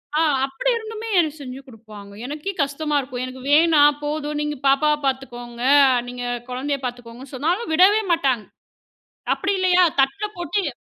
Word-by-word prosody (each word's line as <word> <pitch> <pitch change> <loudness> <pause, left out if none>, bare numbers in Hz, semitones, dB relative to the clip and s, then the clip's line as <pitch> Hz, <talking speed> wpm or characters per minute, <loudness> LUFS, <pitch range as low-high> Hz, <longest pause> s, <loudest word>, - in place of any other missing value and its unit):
அ - - +2 0.3
அப்டி 270 - -2
இருந்துமே 445 0 -7
எனக்கு 315 -2 0
செஞ்சு 260 -1 -8
கொடுப்பாங்க. 215 -4 -13
எனக்கே 300 +8 -4
கஷ்டமா 290 +2 -2
இருக்கும். 255 -2 -5
"எனக்கு 255 0 -9
வேணாம். 295 -2 +5
போதும். 295 0 -3
நீங்கப் 295 -2 -4
பாப்பாவப் 295 +2 +2
பாத்துக்கோங்க. 245 -3 -4 0.4
நீங்கக் 245 -1 -5
குழந்தயப் 275 +2 -3
பாத்துக்கோங்க." 245 0 -7
சொன்னாலும் 325 - -1
விடவே 395 +6 +5
மாட்டாங்க. 270 -9 +1 0.9
அப்டி 395 - -2
இல்லயா? 365 -1 +4 0.2
தட்டுல 270 +10 +1
போட்டுத் 350 0 -2
285 Hz, 140 wpm, -22 LUFS, 255-320 Hz, 0.9 s, வேணாம்